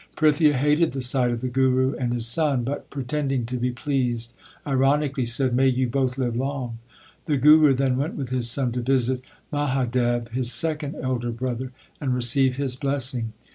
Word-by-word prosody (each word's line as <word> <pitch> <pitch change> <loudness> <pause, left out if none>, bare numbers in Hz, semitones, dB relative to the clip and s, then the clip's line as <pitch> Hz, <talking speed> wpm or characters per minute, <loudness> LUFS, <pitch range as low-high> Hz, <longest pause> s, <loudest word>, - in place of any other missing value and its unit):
Prithia 150 -1 +3
hated 150 +4 +2
the 135 - -3
sight 125 0 +2
of 120 -1 -3
the 130 - -2
Guru 130 +1 +2
and 125 -2 -2
his 120 -2 -1
son, 135 0 +2
but, 140 +4 -5
pre 140 -2 -5
tending 135 -2 -1
to 125 +2 -4
be 125 +1 -1
pleased, 125 -3 -2 0.3
ironically 135 0 +1
said, 120 +2 +1
May 135 +1 +3
you 130 0 +1
both 130 +1 -1
live 120 -3 -1
long! 130 -3 -3 0.5
The 150 - +1
Guru 150 +1 +6
then 130 -1 +1
went 145 +4 -2
with 135 -4 -5
his 125 -2 0
son 125 0 0
to 125 +1 -3
visit 130 0 0 0.3
Mahadev, 125 -4 0
his 125 0 -1
second 150 +3 -2
elder 125 -2 -2
brother, 125 +1 -4 0.3
and 130 -3 -1
receive 125 +1 +3
his 135 -3 -1
blessing. 130 -4 -2
130 Hz, 180 wpm, -24 LUFS, 120-140 Hz, 0.5 s, Guru